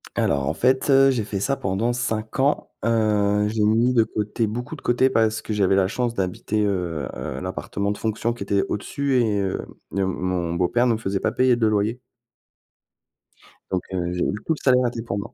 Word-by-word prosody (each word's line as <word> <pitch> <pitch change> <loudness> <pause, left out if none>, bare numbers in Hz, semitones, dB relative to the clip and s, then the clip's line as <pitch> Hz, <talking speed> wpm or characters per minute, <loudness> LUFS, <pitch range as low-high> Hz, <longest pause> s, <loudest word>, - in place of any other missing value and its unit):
Alors 70 -1 +1
en 80 - 0
fait, 130 - +2
heu, 135 0 +6
j'ai 125 -5 0
fait 100 -1 -4
ça 135 +7 0
pendant 100 +5 0
5 110 -1 -3
ans, 140 +3 +1 0.2
heu, 105 -2 +2
j'ai 105 0 0
mis 115 +4 +3
de 115 - +6
côté, 110 +2 -2
beaucoup 120 +3 -5
de - - -13
côté 125 +2 +3
parce 110 -3 +1
que 110 - -4
j'avais 100 -2 +2
la 95 -1 +3
chance 120 +3 -1
d'habiter, 100 +1 -2
heu, 90 -8 -1 0.3
l'appartement 95 +2 -3
de 105 - -2
fonction 110 +1 -1
qui 120 -3 -5
était 100 0 +1
au-dessus 140 +6 -1
et 105 -3 0
heu, 95 -1 -2 0.3
heu, 95 - +2
mon 90 -2 -2
beau-père 90 +8 +1
me 115 -3 +2
faisait 100 -3 -2
pas 110 - 0
payer 130 0 +3
de 120 -2 +1
loyer. 110 +3 +1 1.7
Donc 95 -1 0
heu, 90 -1 -1
j'ai 90 - -1
eu - - 0
tout 160 - +2
le 150 - -9
salaire 125 -2 +4
était 120 -1 -4
pour 105 -3 -4
moi. 100 - -6
110 Hz, 205 wpm, -23 LUFS, 95-120 Hz, 1.7 s, heu